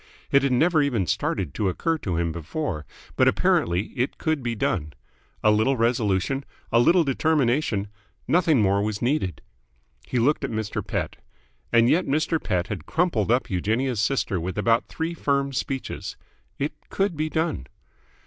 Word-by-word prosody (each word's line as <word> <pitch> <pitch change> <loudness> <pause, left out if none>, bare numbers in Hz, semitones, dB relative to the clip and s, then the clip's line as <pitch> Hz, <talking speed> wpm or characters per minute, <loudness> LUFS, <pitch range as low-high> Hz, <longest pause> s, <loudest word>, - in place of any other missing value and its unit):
It 140 -2 +5
had 135 -1 +1
never 155 +5 +3
even 120 -9 +1
started 85 -1 -1
to 100 -3 0
occur 165 - -1
to 90 - -2
him 85 -1 0
before, 85 - -4 0.3
but - - +4
apparently 90 +5 +2
it 125 +2 -1
could 160 -3 -1
be 120 -1 -2
done. 75 -7 -1 0.5
A 105 - +6
little 110 +6 +2
resolution, 115 +2 +1 0.3
a 115 - +5
little 170 +8 +5
determination... 135 -7 +1 0.4
nothing 160 -8 +3
more 100 0 +2
was 105 0 -2
needed. 120 - -1 0.6
He 125 - -2
looked 140 +5 +2
at 135 - -1
Mr. 110 -2 -3
Pett. - - -3 0.5
And 115 0 +5
yet 170 +8 +2
Mr. 155 +3 0
Pett 90 -4 0
had 100 -8 -6
crumpled 160 - +1
up 125 -2 +1
Eugenia's 110 +6 0
sister 105 -3 0
with 90 +3 -4
about 115 +3 +2
three 165 +1 -3
firm 140 -3 0
speeches. 135 +1 -4 0.4
It 145 +2 -2 0.2
could 195 -3 0
be 155 +1 -1
done. 160 - -1
120 Hz, 160 wpm, -25 LUFS, 100-150 Hz, 0.6 s, A